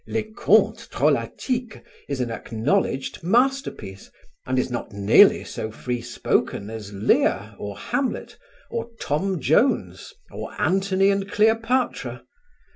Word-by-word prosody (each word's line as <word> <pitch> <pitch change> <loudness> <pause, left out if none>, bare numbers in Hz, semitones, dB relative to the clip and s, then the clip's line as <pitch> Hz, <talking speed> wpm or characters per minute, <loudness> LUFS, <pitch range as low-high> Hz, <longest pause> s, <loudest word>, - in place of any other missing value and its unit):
"Les 220 -1 -3
Contes - - +3
Drolatiques" 250 -4 -1 0.3
is 140 -2 -2
an 120 -2 -2
acknowledged 130 - -1
masterpiece, 230 - 0 0.4
and 130 0 0
is 130 - 0
not 120 - -4
nearly 100 0 +5
so 110 - -5
free 120 +2 -4
spoken 100 -2 -1
as 110 -3 -7
"Lear" 125 - +1
or - - -6
"Hamlet" 270 -3 -3 0.4
or 230 0 -3
"Tom 185 +5 -1
Jones" 160 - +1 0.2
or - - -8
"Anthony 195 +1 +2
and 195 0 -2
Cleopatra." 225 +4 +1
190 Hz, 120 wpm, -23 LUFS, -, 0.4 s, nearly